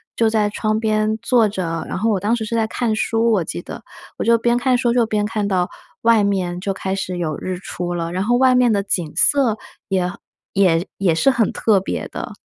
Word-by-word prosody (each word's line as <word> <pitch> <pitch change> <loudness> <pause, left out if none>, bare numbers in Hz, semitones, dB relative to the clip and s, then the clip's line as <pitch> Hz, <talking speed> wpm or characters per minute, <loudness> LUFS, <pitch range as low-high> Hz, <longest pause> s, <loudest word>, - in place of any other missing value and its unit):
就 225 -1 +2
在 215 -2 +1
窗 215 +1 -1
边 215 -1 0
坐 235 -4 +3
着， 165 -5 -3
然 - - -3
后 225 +3 +1
我 205 - +1
当 210 +4 0
时 225 -2 -4
是 230 - -3
在 225 -1 +2
看 225 -1 -1
书， 225 +1 +1
我 190 -5 +2
记 85 - -5
得， - - -9 0.3
我 - - -2
就 230 +1 +4
边 235 +1 +1
看 255 0 +2
书 240 -1 +1
就 240 -1 +3
边 210 -1 -1
看 210 -1 -2
到 185 -2 0 0.3
外 230 -2 +4
面 185 -3 -1
就 195 0 -2
开 190 0 -3
始 185 -2 -4
有 160 -3 -2
日 185 -1 -4
出 175 -2 -5
了， 170 -1 -3
然 185 +1 -1
后 240 +3 +2
外 260 0 +4
面 250 -2 +4
的 200 -2 +2
景 175 -5 -2
色 260 -7 +3 0.3
也 185 -2 +1 0.4
也 180 -2 +2
也 190 -4 +2
是 235 +12 +3
很 235 -6 +1
特 210 -3 +2
别 - - -4
的。 - - -7
210 Hz, 245 characters per minute, -20 LUFS, 185-230 Hz, 0.4 s, 就